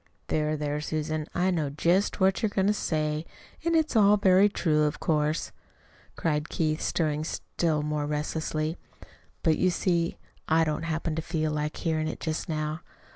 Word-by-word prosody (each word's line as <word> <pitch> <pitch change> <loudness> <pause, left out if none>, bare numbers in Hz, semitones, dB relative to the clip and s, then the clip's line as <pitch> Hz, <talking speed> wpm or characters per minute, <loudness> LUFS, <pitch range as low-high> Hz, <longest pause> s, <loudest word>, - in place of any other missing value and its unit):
"There, 155 0 0
there, 150 0 -2
Susan, 155 0 -2
I 185 +2 +2
know 160 -5 0
just 170 +9 +1
what 190 +2 +3
you're 220 - +2
going 195 -1 0
to 205 - +4
say, 155 -5 -1 0.4
and 335 0 +1
it's 315 -4 +2
all 210 -1 +6
very 195 0 +5
true, 155 -6 +2
of 150 - -2
course," 155 0 0 0.6
cried 150 -1 -1
Keith, 155 -1 0
stirring 155 -2 0
still 155 -1 -1
more 150 -1 -1
restlessly. 155 +1 -2 0.7
"But 160 -3 +3
you 185 - +4
see 170 -1 0 0.3
T 160 +1 +4
don't 155 +1 -1
happen 165 0 -2
to - - 0
feel 155 -1 -1
like 150 0 -2
hearing 155 -2 0
it - - -5
just 160 +1 -3
now. 155 0 -2
155 Hz, 170 wpm, -27 LUFS, 150-175 Hz, 0.7 s, all